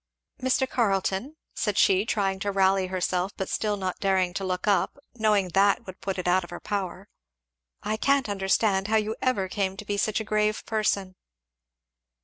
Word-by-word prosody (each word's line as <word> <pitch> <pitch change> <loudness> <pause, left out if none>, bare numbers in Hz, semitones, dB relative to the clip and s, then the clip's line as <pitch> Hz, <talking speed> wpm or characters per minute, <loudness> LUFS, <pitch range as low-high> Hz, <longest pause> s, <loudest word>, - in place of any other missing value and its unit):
"Mr. 260 +1 +2
Carleton," 200 +4 0 0.2
said 210 -3 -1
she, 195 +3 +4
trying 195 -4 0
to 200 +1 -1
rally 190 -1 +3
herself 185 +1 -1
but 190 - -3
still 210 -1 -1
not 185 -2 -3
daring 190 -2 +1
to 195 - -3
look 185 +1 -2
up, 205 +5 +2 0.2
knowing 210 -5 +2
that 200 +6 +3
would 185 0 -10
put 195 -1 -3
it 180 - -3
out 180 +1 +3
of 175 - -10
her 175 - -7
power, 195 -1 -4 0.8
"I 215 +1 -1
can't 275 +2 +2
understand 195 0 +1
how 220 +1 +3
you 215 +1 -1
ever 230 -7 +1
came 190 0 -2
to 210 - -7
be 205 0 -2
such 215 +2 +1
a - - -3
grave 215 0 0
person." 200 -4 -1
195 Hz, 180 wpm, -26 LUFS, 190-215 Hz, 0.8 s, she